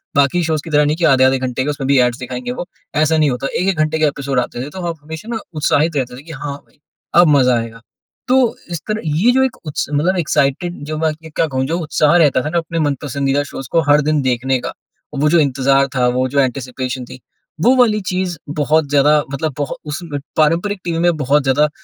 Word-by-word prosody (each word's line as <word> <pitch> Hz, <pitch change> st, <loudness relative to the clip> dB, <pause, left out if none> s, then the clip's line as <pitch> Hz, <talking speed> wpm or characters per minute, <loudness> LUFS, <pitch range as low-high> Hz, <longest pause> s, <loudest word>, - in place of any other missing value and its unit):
बाकी 140 Hz, +5 st, +3 dB
शोज़ 155 Hz, -2 st, -1 dB
की -, -, -9 dB
तरह 150 Hz, -1 st, +3 dB
नहीं 150 Hz, +2 st, 0 dB
कि 170 Hz, -, +1 dB
आधे-आधे 130 Hz, 0 st, +3 dB
घंटे 130 Hz, 0 st, -2 dB
के, 145 Hz, -, -2 dB
उसमें 140 Hz, -2 st, -3 dB
भी 140 Hz, -1 st, +4 dB
ऐड्स 125 Hz, -1 st, +1 dB
दिखाएँगे 125 Hz, -1 st, -5 dB
वो। 175 Hz, -, -6 dB, 0.3 s
ऐसा 155 Hz, +1 st, +2 dB
नहीं 155 Hz, -2 st, +3 dB
होता, 125 Hz, +2 st, -3 dB
1-1 185 Hz, +3 st, -1 dB
घंटे 155 Hz, +1 st, +1 dB
के 155 Hz, -, +3 dB
एपिसोड 140 Hz, -2 st, -1 dB
आते 120 Hz, +1 st, -3 dB
थे, -, -, -7 dB
तो 185 Hz, +5 st, -8 dB
हम 170 Hz, -1 st, -3 dB
हमेशा 160 Hz, +8 st, -8 dB
ना -, -, -2 dB, 0.2 s
उत्साहित 155 Hz, +1 st, +1 dB
रहते 125 Hz, -2 st, -2 dB
थे 135 Hz, -, -12 dB
कि, 165 Hz, -, -11 dB
"हाँ 145 Hz, -1 st, -5 dB
भई, -, -, -31 dB, 0.4 s
अब 175 Hz, 0 st, +7 dB
मज़ा 125 Hz, -2 st, +3 dB
आएगा।" 115 Hz, 0 st, -7 dB, 0.5 s
तो 255 Hz, -, +4 dB, 0.4 s
इस 170 Hz, -, -3 dB
तरह 215 Hz, 0 st, -2 dB
ये 160 Hz, +10 st, +3 dB
जो 265 Hz, +1 st, +3 dB
एक 265 Hz, -, -1 dB
उत्स 150 Hz, -, -2 dB
मतलब 170 Hz, +6 st, +1 dB
एक्साइटेड 165 Hz, +1 st, 0 dB
जो 155 Hz, 0 st, -3 dB
बाकी 160 Hz, 0 st, -2 dB
अब -, -, -14 dB
क्या -, -, +2 dB
कहूँ? 130 Hz, -2 st, -1 dB
जो 165 Hz, +4 st, -1 dB
उत्साह 155 Hz, -1 st, +2 dB
रहता 145 Hz, -6 st, +3 dB
था 150 Hz, -, -3 dB
ना, 170 Hz, -, -1 dB
अपने 165 Hz, 0 st, -2 dB
मन-पसंदीदा 140 Hz, -1 st, 0 dB
शोज़ 135 Hz, -2 st, -8 dB
को 165 Hz, -, +3 dB
हर 145 Hz, +1 st, +6 dB
दिन 150 Hz, 0 st, +1 dB
देखने 130 Hz, 0 st, 0 dB
का, -, -, -5 dB, 0.4 s
वो 145 Hz, +2 st, +2 dB
जो 170 Hz, +2 st, +4 dB
इंतज़ार 135 Hz, -1 st, +2 dB
था, 125 Hz, -1 st, +2 dB
वो 125 Hz, +1 st, +1 dB
जो 140 Hz, +2 st, 0 dB
एंटीसिपेशन 130 Hz, -1 st, -2 dB
थी, 130 Hz, -, -11 dB, 0.4 s
वो 250 Hz, +8 st, +5 dB
वाली 220 Hz, -4 st, +3 dB
चीज़ 180 Hz, -2 st, -2 dB, 0.2 s
बहुत 155 Hz, 0 st, +2 dB
ज़्यादा 145 Hz, +1 st, +4 dB
मतलब 150 Hz, +2 st, -2 dB
बहु 145 Hz, -, -2 dB
उस 145 Hz, -, -3 dB
में 145 Hz, -4 st, -5 dB, 0.2 s
पारंपरिक 170 Hz, +6 st, +2 dB
टीवी 165 Hz, -1 st, -2 dB
में 175 Hz, -1 st, +2 dB
बहुत 145 Hz, 0 st, +2 dB
ज़्यादा 145 Hz, +3 st, +2 dB
150 Hz, 235 wpm, -17 LUFS, 135-165 Hz, 0.5 s, अब